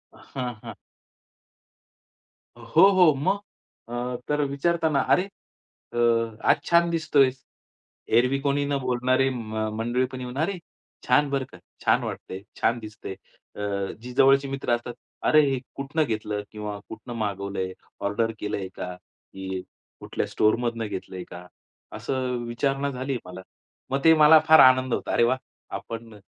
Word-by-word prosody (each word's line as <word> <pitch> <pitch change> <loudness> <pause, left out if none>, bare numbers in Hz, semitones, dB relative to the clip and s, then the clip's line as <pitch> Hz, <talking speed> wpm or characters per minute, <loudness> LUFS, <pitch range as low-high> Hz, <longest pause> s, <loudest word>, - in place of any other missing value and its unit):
हां, 125 -2 -6
हां. - - -8 1.8
हो 155 +12 +5
हो. 180 -6 +6
मग, 190 +9 0 0.5
अ, 120 +1 -3
तर 150 0 0
अ, - - +2
विचारतं 160 +3 0
ना, 140 - +3
"अरे 185 +2 +2 0.7
अ, - - -4 0.5
आज - - +5
छान 170 0 +4
दिसतोयस." 140 -5 +2 0.7
एरवी 130 +3 +1
कोणी 140 0 0
न 140 0 0
बोलणारे 130 +1 +2
म 110 -3 -6 0.2
मंडळी 120 +3 0
पण 130 -1 -6
येऊन, 125 0 -6
"अरे, 180 +5 0 0.5
छान 145 -1 +3
बरं 135 -2 -1
का! 90 - -12 0.3
छान - - +3
वाटतंय, 95 +1 -6 0.2
छान 120 +1 +2
दिसतंय." 105 -3 -8 0.4
अ, - - -6 0.4
जी 125 - -8
जवळची 135 +1 +5
मित्र 135 -2 -3
असतात, 120 0 -7 0.3
"अरे 155 0 +6
हे 135 -2 0 0.2
कुठनं 145 +3 -1
घेतलं?" 105 -3 -3
किंवा 105 -1 -5
"कुठनं 110 +2 -8
मागवलंय? 100 -3 -3 0.3
ऑर्डर 115 +3 0
केलंय 100 -2 -3
का? 90 0 -5
की 95 +1 -8 0.4
कुठल्या - - -3
स्टोअरमधनं 115 +1 +1
घेतलंय 95 -2 -6
का?" 90 0 -9 0.5
असं 130 -2 -2
विचारणा 135 +4 -1
झालीय 130 +1 -3
मला. 90 +1 -9 0.5
मग 135 0 -1
ते 160 - +9
मला 155 +1 +9
फार 160 -2 +8
आनंद 130 -1 +1
होता. - - -4
अरे, 120 - +4
वाह! 130 +2 +3 0.4
आपण 115 -2 -9
125 Hz, 145 wpm, -25 LUFS, 110-140 Hz, 1.8 s, ते